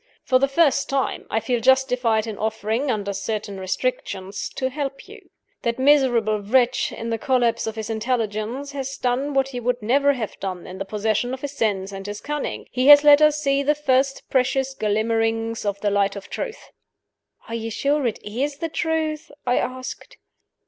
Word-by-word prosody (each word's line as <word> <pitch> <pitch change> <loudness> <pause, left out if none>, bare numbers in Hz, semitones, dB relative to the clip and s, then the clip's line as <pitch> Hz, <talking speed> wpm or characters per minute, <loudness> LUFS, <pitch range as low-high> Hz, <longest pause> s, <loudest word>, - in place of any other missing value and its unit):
For 255 -1 +3
the 275 - +3
first 280 -1 +2
time, 275 -1 -1
I 220 - +1
feel 245 +1 -1
justified 250 -3 +3
in 220 -2 -5
offering 220 +5 -1
(under 205 -4 -1
certain 205 0 -4
restrictions) 195 - -3
to 260 -1 -1
help 275 -1 -5
you. - - -14 0.3
That 235 -1 -1
miserable 255 -6 +3
wretch, 245 +4 +2
in 230 0 -5
the 225 - -1
collapse 240 -3 +1
of 220 - -3
his 220 -1 -4
intelligence, 225 +3 -2
has 275 -1 -5
done 265 +3 -1
what 270 0 +2
he 250 -2 -5
would 245 +1 -1
never 280 +5 +3
have 230 -6 -5
done 185 -2 -5
in 185 - -9
the 195 - -3
possession 215 +5 -1
of 265 - -15
his 285 - -4
sense 200 -7 -1
and 195 0 -7
his 205 0 -5
cunning 295 -1 -4
he 255 +1 +1
has 290 0 +10
let 295 0 +7
us 305 0 +5
see 275 -2 +1
the 295 +2 +2
first 270 -1 +1
precious 265 +1 +1
glimmerings 225 0 0
of 200 -1 -1
the 205 - +1
light 200 0 +1
of 200 - -9
truth." - - -6 0.8
"Are 230 - -7
you 225 -1 -3
sure 280 +4 0
it 225 - -2
is 270 +7 -3
the 330 +2 -3
truth?" 315 -2 -2 0.2
I 245 0 +2
asked. 255 0 -6
245 Hz, 185 wpm, -23 LUFS, 215-275 Hz, 0.8 s, has